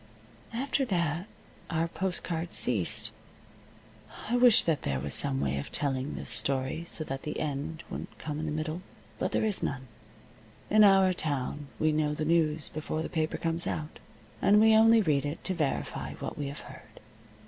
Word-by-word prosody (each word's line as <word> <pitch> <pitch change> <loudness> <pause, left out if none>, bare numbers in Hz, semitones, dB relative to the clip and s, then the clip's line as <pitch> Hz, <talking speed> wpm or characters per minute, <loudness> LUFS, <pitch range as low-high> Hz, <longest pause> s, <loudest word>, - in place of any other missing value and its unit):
After 270 +4 0
that 170 - -1 0.4
our 165 0 0
postal 185 +1 -1
cards 170 0 -3
ceased. 105 -9 +1 1.2
I 240 - +2
wish 245 -2 +6
that 160 -3 0
there 70 -1 -1
was 70 +1 -3
some 65 - +2
way 70 0 0
of 70 - -7
telling 135 -1 -2
this - - -3
story 135 +4 0
so 160 - -1
that 135 -2 -5
the 150 - -4
end 155 +2 -3
wouldn't - - -7
come 150 -1 -5
in 155 - -3
the - - -2
middle. 155 +3 -3 0.4
But - - -1
there - - +1
is 210 -3 0
none. 135 -2 -3 0.8
In 215 0 +7
our 195 -2 +6
town 145 -3 -3
we 155 0 +2
know 150 -1 0
the 155 - -2
news 155 -2 +2
before 155 +1 -3
the - - -5
paper 155 -2 -1
comes 165 +1 +1
out, 155 0 -4 0.4
and 205 +1 +5
we 220 0 +6
only 225 0 +6
read 145 -5 +2
it 145 +3 -4
to 190 - -1
verify 155 -6 -2
what - - -6
we 145 - -3
have 140 +2 -7
heard. - - -13
155 Hz, 180 wpm, -29 LUFS, 145-180 Hz, 1.2 s, In